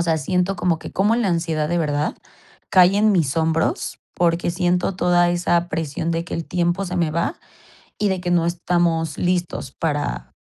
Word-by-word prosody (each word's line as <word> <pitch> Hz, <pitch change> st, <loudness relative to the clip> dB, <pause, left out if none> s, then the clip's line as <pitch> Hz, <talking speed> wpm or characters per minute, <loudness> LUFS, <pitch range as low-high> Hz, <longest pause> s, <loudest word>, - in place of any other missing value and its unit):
O -, -, +3 dB
sea, 165 Hz, -2 st, +1 dB
siento 180 Hz, +5 st, 0 dB
como 170 Hz, -3 st, 0 dB
que -, -, -9 dB
cómo 210 Hz, +4 st, +2 dB
la 235 Hz, -4 st, +1 dB
ansiedad 165 Hz, -3 st, 0 dB
de 175 Hz, -, 0 dB
verdad 150 Hz, -2 st, -1 dB, 0.6 s
cae 185 Hz, +1 st, +6 dB
en 215 Hz, +1 st, +4 dB
mis 160 Hz, -7 st, +1 dB
hombros, 160 Hz, 0 st, 0 dB, 0.2 s
porque 170 Hz, 0 st, +1 dB
siento 180 Hz, +1 st, 0 dB
toda 175 Hz, -1 st, +3 dB
esa 175 Hz, 0 st, +1 dB
presión 160 Hz, 0 st, -2 dB
de 165 Hz, 0 st, -1 dB
que -, -, -6 dB
el 165 Hz, -, -3 dB
tiempo 175 Hz, +2 st, 0 dB
se 180 Hz, -1 st, -4 dB
me 170 Hz, -3 st, +1 dB
va, 170 Hz, -, -2 dB, 0.6 s
y 210 Hz, -, +1 dB
de 190 Hz, -2 st, -1 dB
que 180 Hz, 0 st, -3 dB
no 175 Hz, -2 st, +3 dB
estamos 170 Hz, -2 st, 0 dB
listos 175 Hz, -6 st, -1 dB
para, 145 Hz, -, -3 dB
175 Hz, 190 wpm, -21 LUFS, 165-180 Hz, 0.6 s, cae